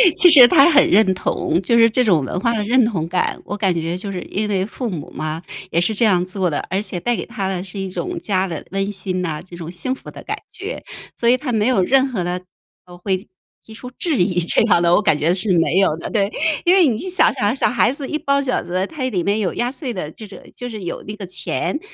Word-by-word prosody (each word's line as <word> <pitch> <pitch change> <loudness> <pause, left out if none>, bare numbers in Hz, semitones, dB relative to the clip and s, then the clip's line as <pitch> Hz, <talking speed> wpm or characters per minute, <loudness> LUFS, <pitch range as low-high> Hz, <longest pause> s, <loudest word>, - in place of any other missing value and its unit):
其 360 -1 +7
实 265 -6 +10
他 305 +1 +6
很 285 -3 +5
认 195 -1 +4
同， 180 -1 -1
就 235 +5 +2
是 230 0 +6
这 250 +3 +1
种 175 - +3
文 155 - -3
化 235 +4 +1
的 210 - -1
认 245 +3 +3
同 180 -8 -2
感， 180 +1 -1
我 205 - -5
感 195 -3 +1
觉 165 +1 -2
就 200 +1 -5
是 180 -2 -5
因 210 +2 -3
为 190 -2 0
父 235 +3 -5
母 165 -7 -6
嘛， 155 +1 -4 0.3
也 170 - +2
是 220 +5 0
这 225 +3 +1
样 180 -4 +3
做 185 -1 -1
的。 145 - -2
而 190 +2 -1
且 190 -4 -3
带 240 +6 0
给 - - -5
他 200 -5 -4
的 185 -2 -3
是 195 +1 -10
一 195 - -3
种 355 - -4
家 190 - -1
的 165 -3 -6
温 195 0 -1
馨 185 -2 -3
呐， 155 -4 -3
这 175 0 -12
种 165 -1 -7
幸 255 +9 -3
福 - - -10
的 - - -11
感 - - -4
觉。 400 +6 -6 0.3
所 235 - -1
以 245 - +6
他 260 -1 -4
没 220 0 +1
有 250 -7 +3
任 265 +7 +3
何 215 -9 -3
的， 180 +1 -3 0.4
呃， 175 0 -13
会 190 +2 -2 0.4
提 220 - -13
出 250 +3 -9
质 320 -7 -1
疑 180 0 +1
这 165 - +1
样 205 -6 +3
的， 170 0 +3
我 - - +4
感 160 -8 +3
觉 160 +4 +2
是 195 +2 -1
没 165 +2 +2
有 160 -5 +2
的， - - -6
对。 200 -2 0 0.3
因 350 - +5
为 360 -6 +5
你 225 -4 0
去 370 - -5
想 370 - +3
想 225 -2 0
小 - - +1
孩 245 -1 +2
子 275 0 -6
一 305 - -2
包 280 0 +1
饺 270 -2 -1
子， 185 +2 -2
他 310 - -9
里 205 -9 -1
面 205 +2 0
有 190 -5 -1
压 245 +1 -1
岁 270 -2 -5
的 160 -5 -5
这 215 - -11
种 195 - -12 0.2
就 245 0 -6
是 215 -4 -7
有 170 - -5
那 210 - -5
个 205 -2 -7
钱， 185 - -3
200 Hz, 290 characters per minute, -19 LUFS, 180-245 Hz, 0.4 s, 实